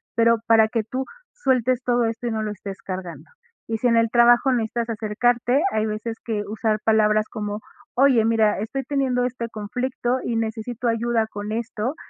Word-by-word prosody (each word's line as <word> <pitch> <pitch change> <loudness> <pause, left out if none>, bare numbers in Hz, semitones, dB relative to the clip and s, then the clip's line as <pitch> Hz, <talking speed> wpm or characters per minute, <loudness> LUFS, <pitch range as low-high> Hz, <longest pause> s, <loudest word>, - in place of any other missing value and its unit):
pero 230 0 +4
para 225 -1 +6
que 225 -1 -1
tú 255 +5 -4 0.3
sueltes 255 - +1
todo 240 -2 +2
esto 230 +2 -3
y - - -1
no 220 -1 -2
lo 215 -1 -2
estés 195 -1 -8
cargando. 185 -3 -7 0.4
Y 225 - -1
si 245 - +1
en 230 - +3
el 230 0 +3
trabajo 240 +3 +5
necesitas 235 -1 -1
acercarte, 235 +4 +1
hay 215 0 0
veces 220 +1 -4
que 215 -3 -2
usar 215 0 -1
palabras 215 -1 +3
como: 210 -1 -4 0.4
"Oye, 260 -3 +5
mira, 220 -2 +2
estoy 245 +6 -3
teniendo 260 -2 0
este 235 -2 -4
conflicto 245 +4 -2
y 235 - -2
necesito 225 +2 -3
ayuda 230 -1 +1
con 210 -1 -6
esto", 230 +3 -3
230 Hz, 180 wpm, -23 LUFS, 215-245 Hz, 0.4 s, para